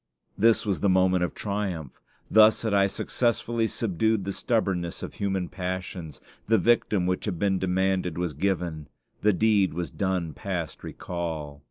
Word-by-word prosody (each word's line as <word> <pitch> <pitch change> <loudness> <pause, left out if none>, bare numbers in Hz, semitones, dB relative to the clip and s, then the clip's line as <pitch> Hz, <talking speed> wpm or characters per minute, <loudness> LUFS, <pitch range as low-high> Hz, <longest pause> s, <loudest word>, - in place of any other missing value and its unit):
This 115 +3 +3
was 100 -4 0
the 100 - +2
moment 95 -1 +3
of 90 - -2
triumph. 100 -8 -4 0.3
Thus 110 +1 +5
had 110 -2 0
I 100 -1 +4
successfully 115 +2 0
subdued 110 -1 0
the 100 - -3
stubbornness 95 -8 -1
of - - -6
human 95 -3 -1
passions: 90 -3 -5 0.3
the 115 +1 +4
victim 110 -5 +2
which 90 0 -1
had 100 -5 -2
been 95 0 +1
demanded 95 -2 0
was 90 -3 -2
given; 85 -2 -2 0.3
the 105 - +4
deed 100 -4 +2
was 85 -4 -3
done 95 -5 -1
past 90 -5 -5
recall. 80 -5 -5
95 Hz, 155 wpm, -26 LUFS, 90-105 Hz, 0.3 s, Thus